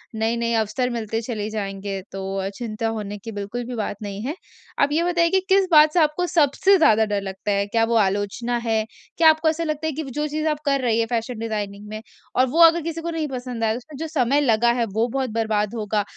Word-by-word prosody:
नए-नए 230 Hz, +1 st, 0 dB
अवसर 220 Hz, +3 st, 0 dB
मिलते 225 Hz, -2 st, -3 dB
चले 220 Hz, -3 st, -4 dB
जाएँगे 195 Hz, -2 st, -4 dB
तो 195 Hz, 0 st, -5 dB
अ, 195 Hz, 0 st, -2 dB
चिंता 225 Hz, -1 st, -3 dB
होने 205 Hz, -1 st, -5 dB
की 215 Hz, +3 st, -8 dB
बिल्कुल 205 Hz, +4 st, -5 dB
भी 245 Hz, +1 st, -6 dB
बात 210 Hz, -3 st, -3 dB
नहीं 200 Hz, -1 st, -5 dB
है। 290 Hz, +5 st, -3 dB, 0.4 s
आप 280 Hz, -, +4 dB
ये 320 Hz, +3 st, +2 dB
बताइए 345 Hz, -1 st, +2 dB
कि, 380 Hz, -, +3 dB
किस 385 Hz, 0 st, +4 dB
बात 305 Hz, -1 st, +7 dB
से 355 Hz, -, +3 dB
आपको 310 Hz, +3 st, +2 dB
सबसे 330 Hz, +6 st, +4 dB
ज़्यादा 220 Hz, -, +4 dB
डर 205 Hz, -1 st, -1 dB
लगता 195 Hz, +1 st, -4 dB
है, 200 Hz, 0 st, +1 dB
क्या 225 Hz, +2 st, +1 dB
वो 230 Hz, +1 st, 0 dB
आलोचना 205 Hz, +5 st, -2 dB
है? 220 Hz, -1 st, +1 dB, 0.3 s
क्या 320 Hz, -1 st, +7 dB
आपको 315 Hz, 0 st, +3 dB
ऐसा 320 Hz, +1 st, -1 dB
लगता 305 Hz, 0 st, -2 dB
है 315 Hz, -, -2 dB
कि 315 Hz, +3 st, -4 dB
वो 275 Hz, -, -8 dB
जो 295 Hz, +4 st, -2 dB
चीज़ 305 Hz, +1 st, -2 dB
आप -, -, -15 dB
कर 275 Hz, -1 st, +2 dB
रही 230 Hz, -3 st, +1 dB
हैं 230 Hz, -, +2 dB
फ़ैशन 230 Hz, 0 st, -3 dB
डिजाइनिंग 210 Hz, -2 st, -4 dB
में 215 Hz, 0 st, -6 dB, 0.3 s
और 255 Hz, -, +4 dB
वो 320 Hz, -, -1 dB
अगर 335 Hz, +1 st, +6 dB
किसी 330 Hz, +1 st, -4 dB
को 340 Hz, -, -4 dB
नहीं 320 Hz, -2 st, -2 dB
पसंद 250 Hz, -3 st, -5 dB
आया, 220 Hz, 0 st, +1 dB
उसमें 280 Hz, +4 st, -11 dB
जो 320 Hz, +3 st, -4 dB
समय 285 Hz, -2 st, +1 dB
लगा 235 Hz, -3 st, +3 dB
है 235 Hz, -, +2 dB
वो 225 Hz, +3 st, +1 dB
बहुत 260 Hz, +1 st, -2 dB
बर्बाद 220 Hz, -1 st, -1 dB
होगा? 210 Hz, -1 st, -1 dB
235 Hz, 240 wpm, -22 LUFS, 215-300 Hz, 0.4 s, बात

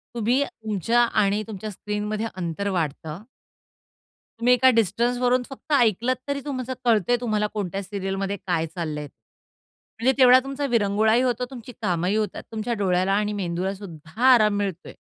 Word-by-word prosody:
तुम्ही 240 Hz, +4 st, +1 dB
तुमच्या 230 Hz, -, 0 dB
आणि 215 Hz, -2 st, +2 dB
तुमच्या 215 Hz, 0 st, -6 dB
स्क्रीनमध्ये 210 Hz, +2 st, -3 dB
अंतर 180 Hz, +2 st, -3 dB
वाढतं. 160 Hz, -1 st, -3 dB, 1.2 s
तुम्ही 245 Hz, +2 st, +4 dB
एका 260 Hz, +1 st, +5 dB
डिस्टन्सवरून 245 Hz, +4 st, +2 dB
फक्त 290 Hz, +3 st, -6 dB
ऐकलत 240 Hz, 0 st, +3 dB
तरी 280 Hz, 0 st, -1 dB
तुमचं 260 Hz, -2 st, -3 dB
कळतं 225 Hz, -2 st, +3 dB
आहे. 245 Hz, -, +4 dB
तुम्हाला 215 Hz, -3 st, 0 dB
कोणत्या 195 Hz, -1 st, -3 dB
सीरियलमध्ये 195 Hz, 0 st, -3 dB
काय 165 Hz, -3 st, +1 dB
चाललं 155 Hz, -4 st, -3 dB
आहे. 150 Hz, -, -6 dB, 0.9 s
म्हणजे 255 Hz, +3 st, +3 dB
तेवढा 255 Hz, 0 st, +8 dB
तुमचा 275 Hz, +1 st, -3 dB
विरंगुळाही 220 Hz, 0 st, +2 dB
होतो, 250 Hz, -1 st, 0 dB
तुमची 250 Hz, -1 st, -9 dB
कामंही 180 Hz, 0 st, 0 dB
होतात, 215 Hz, -1 st, -2 dB
तुमच्या 225 Hz, +2 st, -2 dB
डोळ्याला 190 Hz, -2 st, +1 dB
आणि 210 Hz, +1 st, 0 dB
मेंदूला 185 Hz, 0 st, -2 dB
सुद्धा 165 Hz, 0 st, -11 dB
आराम 210 Hz, -3 st, +4 dB
मिळतो 195 Hz, -4 st, -3 dB
आहे. -, -, -8 dB
210 Hz, 150 wpm, -24 LUFS, 190-240 Hz, 1.2 s, तेवढा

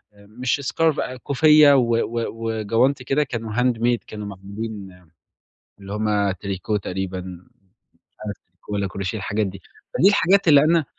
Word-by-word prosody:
مش 120 Hz, +6 st, -3 dB
scarf 160 Hz, -2 st, +2 dB, 0.2 s
كوفية 150 Hz, +1 st, +6 dB
و 120 Hz, -3 st, +2 dB
و 115 Hz, 0 st, -1 dB
وجونتي 115 Hz, +4 st, 0 dB
كده 140 Hz, +4 st, +1 dB
كانوا 115 Hz, -5 st, -5 dB
handmade 120 Hz, -1 st, +1 dB
كانوا 105 Hz, -1 st, -7 dB
معمولين 100 Hz, -1 st, -8 dB, 0.8 s
اللي 100 Hz, +1 st, -9 dB
هُم 105 Hz, -2 st, 0 dB
تريكو 100 Hz, +2 st, -3 dB
تقريبًا، 95 Hz, -1 st, -4 dB
مش 90 Hz, +1 st, -13 dB, 0.6 s
عارف 105 Hz, -, -4 dB
تريكو 90 Hz, +3 st, -14 dB
والّا 100 Hz, -1 st, -1 dB
Crochet 95 Hz, +3 st, -4 dB
الحاجات 105 Hz, 0 st, -1 dB
دي. 95 Hz, -1 st, -8 dB, 0.3 s
فدي 190 Hz, -, +5 dB
الحاجات 200 Hz, -2 st, +3 dB
اللي 145 Hz, -2 st, +8 dB
أنا 165 Hz, -1 st, +3 dB
110 Hz, 140 wpm, -22 LUFS, 100-130 Hz, 0.8 s, اللي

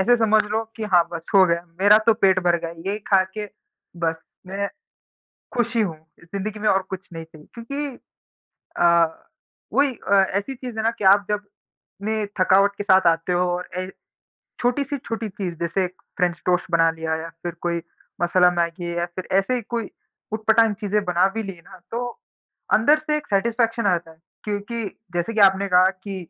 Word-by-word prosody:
ऐसे 240 Hz, +5 st, +4 dB
समझ 220 Hz, -1 st, +4 dB
लो 215 Hz, +2 st, -1 dB
कि 225 Hz, -, -6 dB
हाँ, 175 Hz, -1 st, +6 dB
बस 165 Hz, -1 st, -5 dB
हो 190 Hz, -, +8 dB
गया 170 Hz, 0 st, 0 dB, 0.2 s
मेरा 205 Hz, +2 st, +7 dB
तो 230 Hz, -, +7 dB
पेट 195 Hz, -4 st, +3 dB
भर 175 Hz, -1 st, +4 dB
गया। 165 Hz, -, -3 dB, 0.2 s
ये 210 Hz, -, -3 dB
खा 195 Hz, -2 st, +5 dB
के 210 Hz, -1 st, -3 dB, 0.6 s
बस 160 Hz, 0 st, 0 dB, 0.3 s
मै 200 Hz, +1 st, -3 dB, 0.9 s
खुशी 235 Hz, -1 st, +1 dB
हूँ, 175 Hz, -7 st, -1 dB, 0.3 s
इस -, -, -14 dB
ज़िंदगी 210 Hz, +2 st, -4 dB
में 215 Hz, -, +1 dB
और 190 Hz, 0 st, +3 dB
कुछ 190 Hz, -, -4 dB
नहीं 165 Hz, 0 st, -7 dB
चाहिए 155 Hz, -1 st, -17 dB
क्योंकि 275 Hz, +5 st, -4 dB, 0.9 s
अ, -, -, +4 dB, 0.9 s
वही 280 Hz, -1 st, +3 dB, 0.2 s
अ, -, -, +7 dB, 0.2 s
ऐसी 265 Hz, +7 st, -5 dB
चीज़ 245 Hz, -2 st, -8 dB
है 220 Hz, -, -1 dB
ना 225 Hz, -, +4 dB
कि 205 Hz, -, -4 dB
आप 200 Hz, +1 st, +6 dB
जब 210 Hz, 0 st, -1 dB, 0.6 s
ने 220 Hz, -1 st, 0 dB, 0.2 s
थकावट 195 Hz, +2 st, +4 dB
के 205 Hz, -, -3 dB
साथ 190 Hz, -2 st, +4 dB
आते 165 Hz, +2 st, +2 dB
हो 175 Hz, -, +2 dB, 0.2 s
और 180 Hz, -, -7 dB
ऐ 185 Hz, -, -2 dB, 0.7 s
छोटी-सी 280 Hz, +4 st, 0 dB
छोटी 225 Hz, -3 st, -4 dB
चीज़, 185 Hz, -3 st, -5 dB
जैसे 170 Hz, +3 st, 0 dB
एक 180 Hz, 0 st, -5 dB, 0.2 s
फ्रेंच 175 Hz, -2 st, +1 dB
टोस्ट 180 Hz, -1 st, +2 dB
बना 165 Hz, -1 st, +4 dB
लिया 160 Hz, 0 st, -3 dB
या 165 Hz, -, -6 dB
फिर 175 Hz, -1 st, -3 dB
कोई 170 Hz, -1 st, 0 dB, 0.4 s
मसाला 180 Hz, +1 st, +4 dB
मैगी 170 Hz, 0 st, -2 dB
या 175 Hz, -, +1 dB
फिर 175 Hz, +1 st, -8 dB
ऐसे 225 Hz, +6 st, +1 dB
ही 245 Hz, -, -2 dB
कोई 230 Hz, -3 st, -3 dB, 0.4 s
ऊट-पटाँग 220 Hz, 0 st, +3 dB
चीज़ें 210 Hz, 0 st, 0 dB
बना 180 Hz, +1 st, +3 dB
भी 225 Hz, -, -2 dB
ली 195 Hz, -1 st, -5 dB
ना, 185 Hz, -2 st, -14 dB
तो 240 Hz, +2 st, -2 dB, 0.7 s
अंदर 290 Hz, +8 st, +5 dB
से 300 Hz, 0 st, +1 dB
एक 295 Hz, -, -5 dB
सैटिस्फैक्शन 230 Hz, +2 st, +1 dB
आ 200 Hz, -, +5 dB
जाता 165 Hz, -1 st, -9 dB
है। 160 Hz, -, -17 dB, 0.3 s
क्योंकि 210 Hz, +2 st, -3 dB, 0.3 s
जैसे 175 Hz, +6 st, -1 dB
कि 215 Hz, -, +1 dB
आपने 195 Hz, 0 st, +5 dB
कहा 185 Hz, +1 st, +5 dB
कि 200 Hz, -1 st, -5 dB
200 Hz, 195 wpm, -23 LUFS, 175-225 Hz, 0.9 s, हो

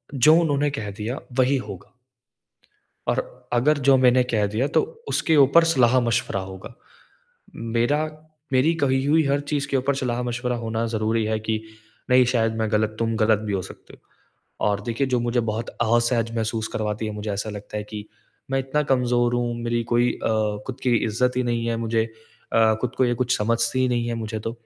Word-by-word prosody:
जो 150 Hz, +5 st, +6 dB
उन्होंने 145 Hz, -3 st, +1 dB
कह 110 Hz, -7 st, -4 dB
दिया 120 Hz, +5 st, -3 dB, 0.2 s
वही 130 Hz, +2 st, +3 dB
होगा। 100 Hz, +1 st, -10 dB, 1.1 s
और -, -, -3 dB
अगर 140 Hz, +5 st, +3 dB
जो 135 Hz, -, +7 dB
मैंने 125 Hz, 0 st, +4 dB
कह 105 Hz, -3 st, +2 dB
दिया 110 Hz, +7 st, -1 dB
तो -, -, +6 dB, 0.3 s
उसके 160 Hz, -, +1 dB
ऊपर 140 Hz, +4 st, +6 dB
सलाह-मशवरा 120 Hz, -7 st, +2 dB
होगा। 95 Hz, +3 st, -8 dB, 1.0 s
मेरा 145 Hz, +6 st, +2 dB, 0.5 s
मेरी 135 Hz, +6 st, +4 dB
कही 130 Hz, -1 st, +2 dB
हुई 155 Hz, +2 st, +3 dB
हर 140 Hz, +1 st, +2 dB
चीज़ 145 Hz, -2 st, 0 dB
के 135 Hz, -, 0 dB
ऊपर 135 Hz, +2 st, 0 dB
सलाह-मशवरा 125 Hz, -1 st, -2 dB
होना 115 Hz, 0 st, -2 dB
ज़रूरी 110 Hz, +1 st, 0 dB
है 110 Hz, 0 st, -1 dB
कि 110 Hz, 0 st, -2 dB, 0.5 s
नहीं 125 Hz, 0 st, +6 dB
शायद 115 Hz, -2 st, +1 dB
मैं 110 Hz, -1 st, -1 dB
गलत 110 Hz, 0 st, +1 dB
तुम 115 Hz, 0 st, 0 dB
गलत 110 Hz, -1 st, +3 dB
भी 105 Hz, -, -1 dB
हो 95 Hz, -, 0 dB
सकते -, -, -12 dB, 0.5 s
हो। -, -, -6 dB
और 100 Hz, -1 st, +1 dB
देखिए 120 Hz, +4 st, 0 dB
जो 125 Hz, -2 st, 0 dB
मुझे 120 Hz, +1 st, 0 dB
बहुत 110 Hz, +2 st, -3 dB
असहज 115 Hz, 0 st, +1 dB
महसूस 110 Hz, 0 st, -2 dB
करवाती 105 Hz, 0 st, -3 dB
है, 105 Hz, -, -4 dB
मुझे 105 Hz, 0 st, -5 dB
ऐसा 100 Hz, +2 st, -3 dB
लगता 105 Hz, 0 st, -8 dB
है 105 Hz, -, -2 dB
कि 105 Hz, 0 st, -8 dB, 0.4 s
मैं 135 Hz, -, +1 dB
इतना 135 Hz, +3 st, 0 dB
कमजोर 120 Hz, -1 st, +2 dB
हूँ, 120 Hz, -1 st, -1 dB
मेरी 120 Hz, 0 st, 0 dB
कोई 120 Hz, +1 st, +3 dB
अ, -, -, -3 dB, 0.4 s
ख़ुद 130 Hz, 0 st, -6 dB
की 125 Hz, -2 st, +3 dB
इज्जत 125 Hz, +3 st, 0 dB
ही 125 Hz, -, +2 dB
नहीं 120 Hz, -1 st, -1 dB
है, 115 Hz, 0 st, 0 dB
मुझे 115 Hz, 0 st, 0 dB, 0.5 s
अ, 110 Hz, -1 st, +4 dB
ख़ुद 125 Hz, 0 st, -3 dB
को 130 Hz, -, +3 dB
ये 120 Hz, -1 st, +1 dB
कुछ 125 Hz, +1 st, 0 dB
समझती 115 Hz, +3 st, +1 dB
ही 130 Hz, -, +2 dB
नहीं 120 Hz, -1 st, 0 dB
है 120 Hz, -, -1 dB
मुझे 110 Hz, -1 st, -4 dB
तो। 115 Hz, +2 st, -4 dB
120 Hz, 190 wpm, -23 LUFS, 110-130 Hz, 1.1 s, जो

